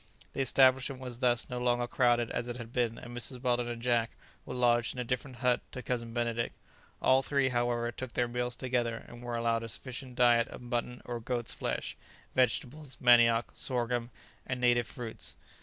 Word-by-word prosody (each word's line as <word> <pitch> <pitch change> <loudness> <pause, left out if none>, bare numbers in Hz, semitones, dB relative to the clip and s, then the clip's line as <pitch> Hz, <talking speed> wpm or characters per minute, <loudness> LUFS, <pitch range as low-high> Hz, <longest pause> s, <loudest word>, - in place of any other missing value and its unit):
The - - -1
establishment 130 0 +4
was 125 -2 -6
thus 120 -3 +2
no 125 -1 -4
longer 120 0 +2
crowded 120 -1 +2
as 120 - -2
it 120 0 -4
had 120 -1 -9
been, 120 -2 0
and 120 0 -9
Mrs. 125 +1 -3
Weldon 120 -1 +1
and 120 -1 -4
Jack 120 -2 +1 0.3
were - - -5
lodged 120 -1 +2
in - - -6
a - - 0
different 125 +1 -3
hut 125 -1 +3
to 125 - -6
Cousin 115 -2 -2
Benedict. 120 0 -1 0.5
All 130 +1 +5
three, 140 -1 +1
however, 120 -1 0
took 130 0 -7
their 120 - +1
meals 125 0 -2
together 120 -3 -1
and 120 0 -11
were 120 -1 -4
allowed 115 -1 +1
a 115 - -6
sufficient 130 +3 -7
diet 120 -1 +5
of - - -9
mutton 120 0 -3
or 120 -1 -4
goats' 120 0 -2
flesh, - - -3 0.4
vegetables, 130 +3 0
manioc, 120 -1 +5
sorghum 120 -2 -1 0.3
and 130 -1 -3
native 120 -2 +3
fruits. 120 -5 -4
120 Hz, 190 wpm, -31 LUFS, 120-125 Hz, 0.5 s, All